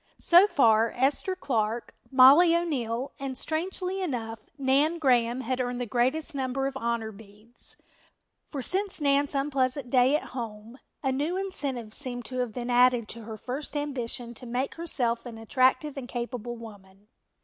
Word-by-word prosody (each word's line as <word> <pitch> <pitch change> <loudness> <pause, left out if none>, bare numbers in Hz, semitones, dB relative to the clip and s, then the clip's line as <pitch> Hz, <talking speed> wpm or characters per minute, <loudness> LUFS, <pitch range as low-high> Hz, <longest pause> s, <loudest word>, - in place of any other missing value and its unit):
So 350 +4 +6
far 230 - +4
Esther 280 +9 +1
Clark, 230 -8 -2 0.2
Mollie 280 +6 +7
O'Neill 260 -7 -2
and, 270 -2 -4
strangely 365 +4 -2
enough, 230 -9 -3 0.2
Nan 280 +4 +2
Graham, 250 -4 +2
had 255 +1 -1
earned 245 0 -2
the 245 - -2
greatest 260 +8 0
number 270 0 -2
of 270 0 -3
honor 235 -3 -2
beads, 215 +3 -11 0.7
for 275 -4 -4
since 390 +4 -1
Nan's 285 0 +2
unpleasant 270 -2 0
day 255 +2 +5
at 305 - -3
home 230 0 -7 0.2
a 265 - +1
new 295 +7 -1
incentive 275 - -3
seemed 245 -3 -3
to 255 +1 -4
have 245 -2 -1
been 245 +2 -4
added 245 -2 +4
to 230 -1 -7
her 220 -1 -7
first 275 +6 -5
ambition 250 -4 -3
to 245 +1 -9
make 250 +3 -2
herself 250 -8 -2
an 230 -2 -8
attractive 255 +5 +1
and 270 -3 -6
capable 240 -1 -4
woman. 205 -3 -13
255 Hz, 160 wpm, -27 LUFS, 235-285 Hz, 0.7 s, Mollie